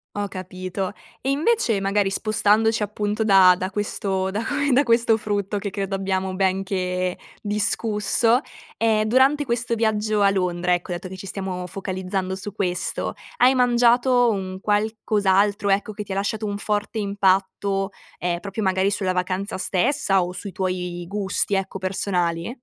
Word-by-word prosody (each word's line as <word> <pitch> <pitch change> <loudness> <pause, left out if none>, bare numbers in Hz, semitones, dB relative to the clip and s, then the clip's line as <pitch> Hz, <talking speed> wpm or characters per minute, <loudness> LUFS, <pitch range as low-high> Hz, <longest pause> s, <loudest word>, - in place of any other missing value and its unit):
Ho 205 0 -2
capito. 185 0 -5 0.3
E 270 - -2
invece, 295 - +2
magari 195 0 +1
spostandoci, 215 +1 +2
appunto, 210 +1 -2
da 190 -3 +7
da 185 +1 -3
questo 195 -2 -2
da 210 +4 -2
que 285 +1 0
da 275 - +5
questo 230 -2 +3
frutto 205 -1 -2
che 200 0 -3
credo 195 0 -3
abbiamo 190 -1 -2
ben 190 0 +1
che 185 -1 -2 0.2
discusso, 210 +3 +1 0.3
ehm, 220 -1 +2
durante 265 +6 +3
questo 235 0 -1
viaggio 215 -1 0
a 200 - +5
Londra, 180 -2 0
ecco, 175 +1 -2
dato 175 +1 -4
che 190 - -8
ci 190 +1 -9
stiamo 185 -2 -4
focalizzando 190 0 -3
su 200 +2 -6
questo, 180 -4 -2 0.2
hai 255 +2 +5
mangiato 245 0 +4
un 190 -2 -4
qualcos'altro, 205 -1 +1
ecco, 205 +2 +1
che 210 - -5
ti 205 - -10
lasciato 205 +2 -2
un 205 -1 -2
forte 210 +1 -2
impatto, 195 0 0 0.3
ehm, 175 0 -2
proprio 200 +2 -4
magari 190 +1 +2
sulla 190 -2 0
vacanza 185 +3 -2
stessa, 195 +1 +1
o 180 - -5
sui 200 +1 -6
tuoi 180 -1 -3
gusti, 200 0 -1
ecco, 195 0 -2
personali? 185 -1 -1
200 Hz, 155 wpm, -23 LUFS, 190-215 Hz, 0.3 s, da